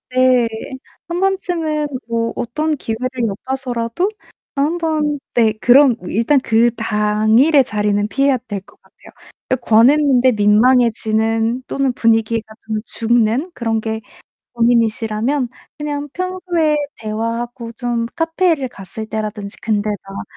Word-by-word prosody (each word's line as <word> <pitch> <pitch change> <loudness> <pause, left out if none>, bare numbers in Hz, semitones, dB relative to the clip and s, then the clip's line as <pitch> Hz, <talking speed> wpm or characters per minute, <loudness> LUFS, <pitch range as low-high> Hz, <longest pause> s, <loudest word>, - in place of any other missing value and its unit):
네, 255 -2 +4 0.6
1 345 +1 -2
번쯤은 345 -6 0 0.2
뭐 230 0 -1
어떤 305 +6 -1
기회를 240 +1 -3 0.2
엿봐서라도 245 - -3 0.5
어, 275 - 0
한번 310 -1 0
네, 225 -2 +4
그럼 255 +1 +6
일단 235 +9 +2
그 235 -1 +2
당일의 220 +8 +3
자리는 210 -1 0
피해야 275 +4 +2
될 205 -3 -4
것 - - -23
같아요. - - -19 0.4
그러니까 255 -2 -2
권했는데 260 +2 +5
민망해지는 225 +1 +2
또는 275 -1 0
분위기가 225 -1 +1
좀 220 -1 -1
죽는 235 +7 +1
그런 225 -5 -1
게 220 0 -3 0.5
고민이시라면 235 +2 +1 0.3
그냥 295 -1 -3
평소에 360 -4 0 0.2
대화하고 230 +2 -4
좀 235 0 -2
카페를 325 -3 +1
갔을 200 0 -7
때라든지 215 -2 -5
근데 215 -1 0
막 195 0 -7
235 Hz, 270 characters per minute, -18 LUFS, 220-285 Hz, 0.6 s, 그럼